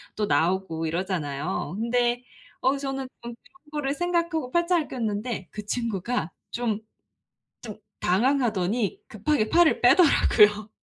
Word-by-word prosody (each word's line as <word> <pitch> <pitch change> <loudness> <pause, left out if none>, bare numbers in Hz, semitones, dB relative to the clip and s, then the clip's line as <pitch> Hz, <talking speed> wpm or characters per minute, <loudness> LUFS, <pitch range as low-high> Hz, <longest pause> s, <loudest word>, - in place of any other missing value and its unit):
또 210 - 0
나오고 165 -2 0
이러잖아요. 170 -1 -3
근데 240 +1 +1 0.4
어 265 +2 +2
저는 270 -1 -4
좀 235 0 -7
그런 280 +9 -26
거를 290 -2 -1
생각하고 335 -4 -1
팔짱을 345 -1 +1
꼈는데 220 -4 -3
그 210 -1 -7
친구가 220 -5 -2 0.2
좀 230 -3 -1 0.9
뜸 215 -3 -7 0.2
당황하더니 220 -1 +1
급하게 215 +2 0
팔을 345 -1 +4
빼더라고요. 215 - +5
235 Hz, 275 characters per minute, -25 LUFS, 195-275 Hz, 0.9 s, 빼더라고요